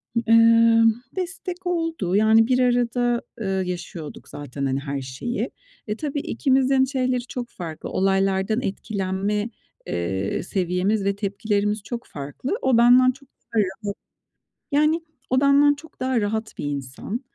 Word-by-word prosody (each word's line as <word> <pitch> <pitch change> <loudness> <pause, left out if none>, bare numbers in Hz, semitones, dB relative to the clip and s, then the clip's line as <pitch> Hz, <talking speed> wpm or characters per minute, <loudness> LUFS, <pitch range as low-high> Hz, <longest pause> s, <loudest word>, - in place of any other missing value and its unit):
Iıı, 230 0 +5 0.3
destek 365 0 -5
oldu. 330 - -1
Yani 220 +2 +5
bir 255 0 +2
arada, 245 -1 +2 0.2
eee, 205 - -2
yaşıyorduk 180 -4 -4
zaten, 140 -1 -5
hani, 135 0 0
her 140 -1 -4
şeyi. 135 - -4 0.4
E, 210 - -1
tabii 290 +3 -3
ikimizin 265 -1 +2
şeyleri 255 -2 0
çok 245 -1 -5
farklı. 165 -7 -7
Olaylardan 195 +3 +1
etkilenme, 200 0 -2 0.4
eee, 95 +3 -2
seviyemiz 185 +3 0
ve 200 0 +1
tepkilerimiz 205 0 -1
çok 240 +2 -6
farklı. 145 - -4
O 260 -3 +3
benden 250 +2 +6
çok 275 +1 -18
daha 230 - -4
rahat 200 +1 -4 0.8
Yani 305 +3 +3 0.3
o 260 +1 +3
benden 285 +1 +5
çok 320 +3 -16
daha 255 -2 +1
rahat 220 +1 -3
bir - - -4
insan. 140 - -4
220 Hz, 135 wpm, -23 LUFS, 190-255 Hz, 0.8 s, benden